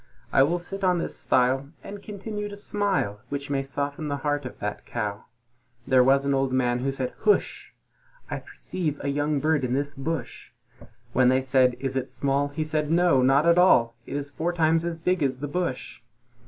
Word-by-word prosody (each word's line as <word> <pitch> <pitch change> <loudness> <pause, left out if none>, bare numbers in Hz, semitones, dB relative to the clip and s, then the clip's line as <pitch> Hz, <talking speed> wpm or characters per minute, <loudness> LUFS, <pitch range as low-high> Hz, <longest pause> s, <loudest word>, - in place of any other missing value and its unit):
I 135 - +6
will 160 +6 +3
sit 195 +3 -7
on 180 -1 +3
this 170 - -3
stile, 130 +2 +1
and 200 0 -8
continue 210 0 -5
to 205 - -8
smile, 200 - -1
Which 140 0 -4
may 135 -1 +1
soften 140 +2 -4
the 145 -1 -2
heart 145 -1 0
of - - -11
that 105 0 -4
Cow." 105 -3 -4 0.6
There 130 -1 +5
was 135 +2 +4
an 140 - +2
Old 135 -1 +1
Man 125 -1 +1
who 135 +2 -1
said, 130 -2 -3
"Hush! 210 -2 +1 0.6
I - - -4
perceive 155 -6 -4
a 140 - -1
young 145 +1 0
bird 155 -1 +1
in 125 -1 -1
this 145 +1 -1
bush!" 160 +4 -5 0.6
When 130 -1 +4
they 130 +1 +2
said, 130 -2 +3
"Is 135 0 -3
it 130 - -2
small?" 140 +1 0
he 155 +2 -3
replied, 155 -1 -1
"Not 140 -4 +4
at 170 +1 +5
all; 120 -10 +5
It - - -5
is 145 0 -4
four 170 +4 -2
times 165 0 +2
as 170 -1 -3
big 180 +2 0
as 135 -3 +1
the 145 +3 -4
bush!" 145 -6 -3
140 Hz, 195 wpm, -26 LUFS, 130-165 Hz, 0.6 s, I